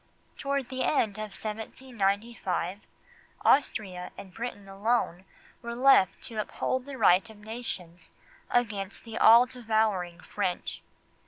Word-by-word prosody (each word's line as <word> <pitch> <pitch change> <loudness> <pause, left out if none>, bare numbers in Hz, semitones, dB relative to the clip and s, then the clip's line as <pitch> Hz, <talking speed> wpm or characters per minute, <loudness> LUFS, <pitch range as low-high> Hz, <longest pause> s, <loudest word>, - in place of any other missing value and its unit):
Toward 275 -2 -2
the 260 0 -3
end 215 -8 +1
of 215 -1 -5
1795, 215 -4 -2 0.7
Austria 190 -10 +2
and 190 -2 -10
Britain 225 -3 -6
alone 195 -2 0 0.4
were 235 -1 -5
left 245 -7 +5
to 225 -2 -5
uphold 255 +4 -2
the 280 -1 -7
right 195 0 +5
of 220 - -13
nations 210 -6 -6 0.4
against 205 -5 -1
the 225 -1 -6
all 230 +2 +8
devouring 220 -8 0
French. 185 -4 -3
220 Hz, 115 wpm, -29 LUFS, 195-245 Hz, 0.7 s, all